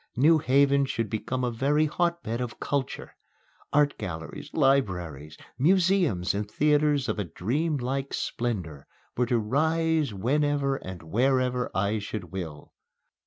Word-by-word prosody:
New 155 +6 +5
Haven 140 0 +3
should 115 -5 -3
become 125 +4 -2
a 125 - 0
very 145 +6 +2
hotbed 170 -7 -1
of 120 -2 -5
culture. 140 -2 -3 0.6
Art 145 0 +2
galleries, 80 -5 -6
libraries, 90 - 0 0.2
museums 170 - +3
and 105 +1 -3
theatres 150 -1 +2
of - - -2
a - - +1
dreamlike 135 - -2
splendor 90 -12 -3 0.3
were 125 0 +1
to 120 -1 +2
rise 160 +5 +1
whenever 140 +6 +1
and 95 -6 -8
wherever 125 +6 +1
I 100 +3 +1
should 100 -4 -6
will. 80 -6 -7
130 Hz, 125 wpm, -27 LUFS, 105-145 Hz, 0.6 s, New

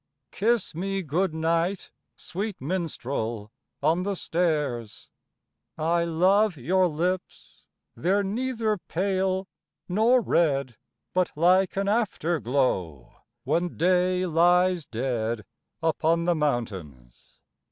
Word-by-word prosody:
V - - -18
Kiss 230 -2 +1
me 195 +3 -2
good 170 +4 0
night, 165 +4 -1 0.3
sweet 200 +2 -5
minstrel, 130 - -3 0.3
on 160 +4 +3
the 200 +1 -2
stairs! 150 - -2 0.7
I 170 +2 +1
love 185 +3 +3
your 180 +8 +2
lips, 175 +3 -4 0.3
they're 195 +4 +1
neither 225 0 -1
pale 190 +1 -1 0.4
nor 220 +7 +4
red, 140 - +1 0.4
But 185 -1 +1
like 180 +4 +3
an 195 0 0
after 200 -6 0
glow, 95 - -1 0.3
when 165 +6 -1
day 180 +1 +2
lies 175 0 +3
dead 115 -2 -2 0.4
Upon 165 +1 +1
the 175 - +3
mountains. 95 - -4
170 Hz, 105 wpm, -26 LUFS, 140-190 Hz, 0.7 s, nor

